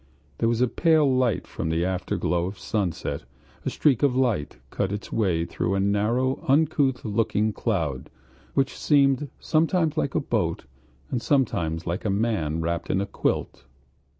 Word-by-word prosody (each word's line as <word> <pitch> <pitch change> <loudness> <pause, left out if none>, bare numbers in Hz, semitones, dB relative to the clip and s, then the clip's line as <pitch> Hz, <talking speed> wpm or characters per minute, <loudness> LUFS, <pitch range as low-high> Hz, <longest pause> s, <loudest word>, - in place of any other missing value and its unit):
There 115 - +2
was 115 0 0
a 125 - +4
pale 160 +3 +3
light 130 -5 +1
from 80 - -4
the 80 +2 +1
afterglow 90 -1 -1
of 95 +1 -7
sunset; 95 -7 -2 0.4
a - - -1
streak 135 -7 +2
of 140 -3 +3
light 120 - 0
cut 100 -1 -1
its 105 0 -5
way 90 -7 +1
through 90 +2 -1
a - - +1
narrow, 110 - +1
uncouth 140 -3 +2
looking 105 0 +1
cloud, 80 - -2 0.5
which 135 0 +1
seemed 140 -1 +3
sometimes 160 0 +1
like 140 -3 -1
a - - +4
boat - - -1 0.5
and 120 - -1
sometimes 85 - 0
like 85 +4 -3
a 105 - -1
man 95 -7 0
wrapped 85 +1 -2
in 95 - +1
a 100 - 0
quilt.... 100 - -2
110 Hz, 160 wpm, -25 LUFS, 90-135 Hz, 0.5 s, a